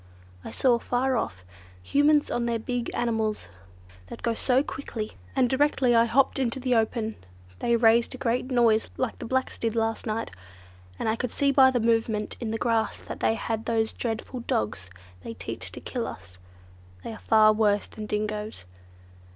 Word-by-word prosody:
I - - -7
saw, 245 -3 +2
far 255 +2 0
off, 90 - -3 0.4
Humans 290 - +3
on 235 0 0
their 235 -1 0
big 240 +1 -3
animals 220 - -1 0.6
that - - -10
go 235 - +1
so 255 +3 +2
quickly, 230 -7 -5 0.2
and 250 - +4
directly 265 -1 +2
I 230 0 +6
hopped 270 +4 +2
into 260 0 -1
the 255 -1 0
open, 225 -1 0 0.4
they 235 - +2
raised 235 +2 +4
a - - -8
great 250 0 -1
noise 235 -3 +3
like 255 -3 -2
the - - -6
blacks 260 +2 -1
did 230 -1 -1
last 225 0 -1
night, 220 +1 -2 0.7
and - - -3
I 220 - +2
could 250 +1 -3
see 280 +3 +1
by 265 -1 +7
the 255 -2 +1
movement 225 -2 0
in 235 - -3
the 225 - -1
grass 225 -2 0
that - - -7
they 225 - +2
had 225 0 -3
those 225 -1 0
dreadful 235 +2 -4
dogs 105 - -2 0.3
they 115 - -7
teach - - -6
to - - -7
kill - - -4
us: 90 -1 -10 0.6
they - - -5
are 220 - -10
far 215 -1 +5
worse 210 -1 +2
than 215 -1 -8
dingoes. 210 - -3
230 Hz, 180 wpm, -26 LUFS, 220-250 Hz, 0.7 s, by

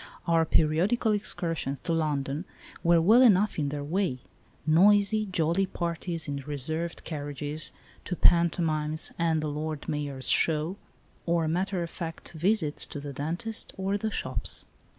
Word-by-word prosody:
Our 165 -1 +3
periodical 180 +11 +2
excursions 165 -9 -1
to 170 - -1
London 150 0 -1 0.4
were 170 0 +5
well 215 +9 +6
enough 210 -6 +4
in 145 -2 0
their 145 0 -4
way; 165 -3 -1 0.5
noisy, 205 +6 +4
jolly 180 +1 +1
parties 170 -2 -3
in 140 -1 -3
reserved 150 +4 -2
carriages 145 0 -3 0.3
to 180 - -3
pantomimes 160 -3 +2
and 165 -2 +2
the - - -1
Lord 150 0 -4
Mayor's 140 -3 -2
Show, 160 +4 +2 0.5
or 170 -1 +2
matter 180 +2 -1
of 170 - -6
fact 165 -2 -6
visits 170 -2 +1
to 145 - -6
the 140 0 -7
dentist 170 +11 -3
or 195 +1 -1
the 220 +2 -1
shops. - - -3
165 Hz, 140 wpm, -28 LUFS, 150-185 Hz, 0.5 s, well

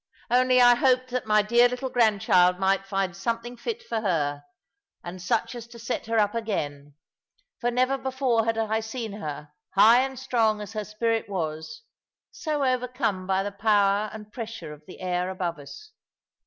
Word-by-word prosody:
Only 255 +1 +4
I 245 0 +8
hoped 255 +1 +2
that 250 -2 -2
my 210 -1 +4
dear 240 +3 +4
little 250 +1 -4
grandchild 195 -6 +3
might 195 +1 +1
find 195 -2 -1
something 230 +4 -3
fit 460 - -5
for 225 - -3
her, 145 -8 -1 0.6
and 175 +1 -8
such 180 - -1
as 235 -2 -8
to 235 0 -13
set 230 0 -4
her 225 0 0
up 210 -1 +2
again; 145 -11 -4 0.6
for 240 - 0
never 255 +2 +1
before 260 -4 0
had 225 0 0
I 220 0 0
seen 225 -1 -5
her, 150 -6 -7 0.2
high 220 +5 +7
and 265 0 -3
strong 230 -4 +1
as 210 +1 -8
her 215 -1 -3
spirit 225 +1 -1
was, 165 +4 -4 0.5
so 300 -3 -2
overcome 250 -7 -1
by 190 0 +1
the 205 - -4
power 205 0 +2
and 210 -1 -11
pressure 225 -9 -7
of 150 - -14
the 185 - -12
air 180 0 -1
above 175 -4 -3
us. 430 - -12
220 Hz, 175 wpm, -26 LUFS, 190-245 Hz, 0.6 s, I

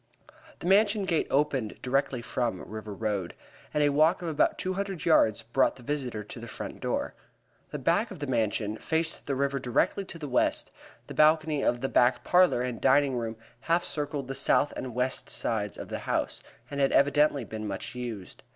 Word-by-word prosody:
The - - -7
Mansion 205 +2 +4
gate 165 -4 +1
opened 135 -6 0
directly 130 -1 0
from 120 -6 -2
River 110 0 -7
Road, 100 -4 -2 0.4
and 150 - +1
a 145 - +4
walk 155 +6 +3
of 170 - -2
about 155 - +2
two 185 - -2
hundred 195 -2 -4
yards 110 -10 +4
brought 120 +4 +2
the 125 - -14
visitor 125 -6 -3
to 105 - -9
the 115 - -8
front - - -7
door. - - -2 0.6
The - - -4
back - - +1
of - - -8
the 145 - -4
Mansion 110 -4 0
faced 160 +5 -2
the 140 - 0
river 140 +1 0
directly 165 - +1
to 180 - -8
the 150 -3 -6
west, 125 - +1 0.3
the - - -8
balcony 155 -1 +3
of 120 -2 +1
the 135 - 0
back 125 -1 +3
parlor 180 -9 +4
and 125 -3 -4
dining 140 -2 +4
room 115 -2 -3 0.3
half 170 +1 +3
circled 145 -3 -3
the 135 - -3
south 140 +1 +3
and 125 -3 -5
west 125 +1 -1
sides 105 -4 -2
of - - -8
the - - -3
house, - - -2 0.3
and 140 - -3
had 135 -1 +3
evidently 145 -1 +3
been 110 -1 -6
much 100 +4 -5
used. 120 -6 -7
135 Hz, 195 wpm, -28 LUFS, 115-155 Hz, 0.6 s, Mansion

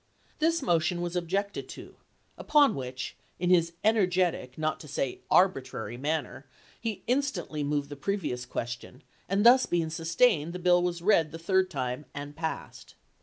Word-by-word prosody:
This 330 -1 +2
motion 175 -4 +1
was 175 0 -3
objected 195 +4 -2
to, - - -11 0.4
upon 295 -2 +4
which, 130 -1 -5 0.2
in 180 +1 0
his 170 -2 +3
energetic, 185 - +1
not 155 0 -1
to 150 - -11
say 135 -2 -3
arbi 185 -6 +4
trary, 120 -2 -7
manner, 145 -1 -3 0.3
he 225 -4 -4
instantly 250 - -1
moved 145 0 -1
the 145 - -6
previous 150 -6 -2
question, 120 +2 -6 0.3
and 200 +3 +1
this 255 +2 +7
being 165 -2 0
sustained, 165 +1 +2
the - - -4
bill 180 0 +4
was 175 -1 -2
read 165 -6 +3
the 165 - -6
third 190 +2 +1
time 130 -1 -3
and 145 +1 -6
passed. 160 0 -6
170 Hz, 160 wpm, -28 LUFS, 145-190 Hz, 0.4 s, this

